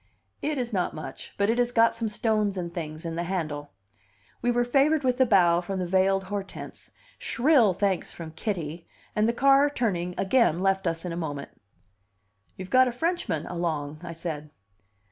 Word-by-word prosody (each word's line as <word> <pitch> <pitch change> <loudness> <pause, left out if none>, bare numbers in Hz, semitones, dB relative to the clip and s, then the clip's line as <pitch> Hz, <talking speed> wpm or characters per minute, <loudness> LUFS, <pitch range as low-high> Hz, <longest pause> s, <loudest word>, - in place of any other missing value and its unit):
"It 300 0 -1
is 245 -2 -3
not 180 -3 0
much, 145 -4 -8
but 200 +2 +2
it 235 - 0
has 245 0 +2
got 230 -1 +4
some 230 -1 -2
stones 210 -2 0
and 170 -2 -4
things 155 -1 -6
in 165 - -3
the 170 +1 -2
handle." 155 -6 -3 0.7
We 245 - +1
were 245 0 +2
favored 280 +4 +3
with 255 0 +1
a 260 - +5
bow 175 -5 +5
from 190 +2 -4
the 185 - -1
veiled 190 +2 +2
Hortense, 195 0 -7 0.3
shrill 245 -6 +3
thanks 195 -1 0
from 165 -2 -8
Kitty, 165 -2 -4 0.3
and 215 +2 +3
the - - +4
car, 275 +3 +5
turning, 180 -10 -1
again 195 -5 +3
left 195 0 +1
us 165 +1 -2
in 175 - -3
a - - -3
moment. 145 -4 -4 1.1
"You've 185 +1 -8
got 255 0 +6
a - - 0
Frenchman 245 - -1
along," 155 -4 -3
I 170 -1 -6
said. 160 -3 -5
190 Hz, 185 wpm, -27 LUFS, 170-235 Hz, 1.1 s, got